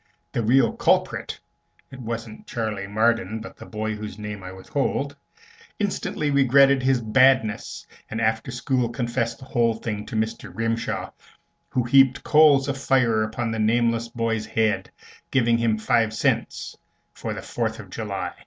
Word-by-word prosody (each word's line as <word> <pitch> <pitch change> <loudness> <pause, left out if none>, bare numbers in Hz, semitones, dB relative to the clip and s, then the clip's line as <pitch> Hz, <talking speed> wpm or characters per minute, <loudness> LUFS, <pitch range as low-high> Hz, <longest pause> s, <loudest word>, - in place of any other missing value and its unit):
The - - -1
real 120 +2 +3
culprit - - 0 0.5
(it 130 - -10
wasn't 115 -2 -6
Charley 110 -4 -3
Marden, 110 0 +1
but 115 - -10
the - - -12
boy 110 0 -3
whose 105 -1 -7
name 105 -1 -6
I 95 0 -8
withhold) 140 +8 -2 0.6
instantly 190 -7 -1
regretted 140 0 +5
his 130 -1 +2
badness, 120 -1 +2 0.2
and 110 - -4
after 110 +2 0
school 125 0 0
confessed 120 -1 -2
the 130 - -12
whole 115 -3 +1
thing 105 -2 -5
to 125 - -6
Mr. 110 -2 -2
Grimshaw, 115 +4 -2 0.6
who 125 - 0
heaped 135 +2 +4
coals 150 -3 +5
of 135 -1 -2
fire 125 -5 +2
upon 115 +2 -2
the 110 - -3
nameless 115 +1 +2
boy's 115 -2 -2
head 110 -2 0 0.4
giving 115 -3 +2
him 115 -2 +1
five 110 0 +1
cents - - -1 0.4
for - - -5
the - - -7
Fourth - - -3
of - - -11
July. - - -4
115 Hz, 155 wpm, -24 LUFS, 110-130 Hz, 0.6 s, regretted